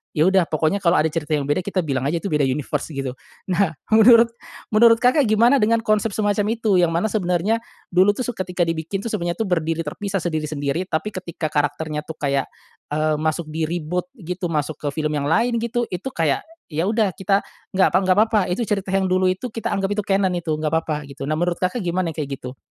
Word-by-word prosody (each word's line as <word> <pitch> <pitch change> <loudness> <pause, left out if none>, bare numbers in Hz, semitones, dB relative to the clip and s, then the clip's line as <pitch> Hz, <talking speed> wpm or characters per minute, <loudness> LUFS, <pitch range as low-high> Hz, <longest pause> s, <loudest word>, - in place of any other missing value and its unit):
"Ya, 155 - +3
udah 190 -3 +3
pokoknya 155 +5 0
kalau 180 -2 +3
ada 155 - +3
cerita 155 -1 -1
yang 145 - -1
beda, 145 +4 0
kita 190 -1 -1
bilang 135 -4 -1
aja 165 +4 0
itu - - -1
beda 150 -1 +2
universe 140 +2 -2
gitu." 135 -4 -4 0.4
Nah, 180 -2 +1 0.2
menurut 230 +1 +7 0.4
menurut 230 +2 +6
Kakak 255 +1 +4
gimana 235 +6 +4
dengan 230 +1 +3
konsep 215 0 +1
semacam 205 +1 +1
itu, 215 -5 +2
yang 175 -2 +3
mana 170 +6 +1
sebenarnya 195 +2 +1 0.3
dulu, 190 +3 +4
tuh, 255 - -2
su - - 0
ketika 180 -1 -1
dibikin, 165 +3 -2
tuh, 230 - -3
sebenarnya 175 -4 -2
berdiri 165 -4 -1
terpisah 195 +6 -3
sendiri-sendiri 155 +1 -2
tapi 200 +7 -2
ketika 170 -4 -5
karakternya, 150 +1 -1
tuh, 160 - -6
kayak, 140 -2 0 0.4
eee, 155 +1 +1
masuk 155 +1 -1
di-reboot 165 +3 -2
gitu, 180 0 -4
masuk 155 -2 -2
ke 145 - -4
film 155 -1 -1
yang 145 -1 -1
lain 235 +9 +2
gitu, 235 +1 -1
itu 180 +7 -4
kayak, 155 -5 0 0.3
"Ya, 160 +5 0
udah 215 -3 +2
kita, 195 +1 +1 0.3
nggak 190 - +5
pa - - +4
nggak 185 0 +3
papa 215 -1 +2
itu 200 +7 0
cerita 195 -2 -1
yang 190 -1 +2
dulu 185 0 +3
itu 215 +6 -5
kita 225 0 -4
anggap 195 -1 -1
itu - - -1
canon 195 -1 +2
itu 165 -2 -2
nggak 155 +1 -2
papa 155 -2 -4
gitu. 135 0 -6
Nah, 155 - 0
menurut 175 0 0
Kakak 185 +6 -1
gimana 175 -1 -1
yang - - -21
kayak 135 -1 -6
gitu? 125 +1 -7
175 Hz, 215 wpm, -22 LUFS, 155-205 Hz, 0.4 s, menurut